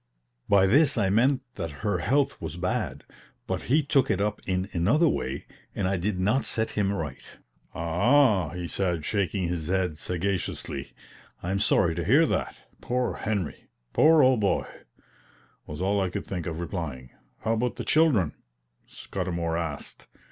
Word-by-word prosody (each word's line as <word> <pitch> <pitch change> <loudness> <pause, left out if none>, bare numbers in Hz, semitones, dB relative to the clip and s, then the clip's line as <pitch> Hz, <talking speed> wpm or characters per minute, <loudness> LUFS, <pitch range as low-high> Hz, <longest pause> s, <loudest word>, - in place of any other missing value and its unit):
By 100 -1 +5
this 140 +9 +4
I 100 -3 +2
meant 130 +5 +3
that 85 -4 -3 0.2
her 100 -4 +1
health 140 +8 +1
was 80 -1 -5
bad; 90 +1 -2 0.4
but - - -2
he 150 +5 +2
took 135 -1 +2
it 95 - +1
up 105 +1 -1
in 95 0 0
another 115 - +3
way, 65 - -2 0.3
and 95 - 0
I 95 0 0
did 90 +1 -2
not 105 +9 +2
set 110 0 +1
him 100 -2 0
right. 80 -9 -4 0.5
"Ah, 100 - +3
ah!" - - -7
he 85 +2 -5
said, 85 -4 -1
shaking 100 -3 0
his 85 -3 -3
head 90 -4 0
sagaciously; 90 -6 -3 0.5
"I'm 95 +3 -1
sorry - - +3
to - - -3
hear - - +5
that. - - -2 0.2
Poor 125 0 -1
Henry!" 100 -7 -3 0.3
"Poor 155 -1 +6
old 130 -2 +4
boy!" 100 -2 +1 1.0
was 75 +4 -5
all 100 +1 +2
I 95 - 0
could - - -5
think 90 -3 -4
of 80 -1 -4
replying. 75 -8 -5 0.3
"How 115 - 0
about 120 +2 -1
the - - -5
children?" 130 - +3 0.5
Scudamour 85 -2 -3
asked. 80 -4 -5
95 Hz, 160 wpm, -27 LUFS, 85-115 Hz, 1.0 s, Poor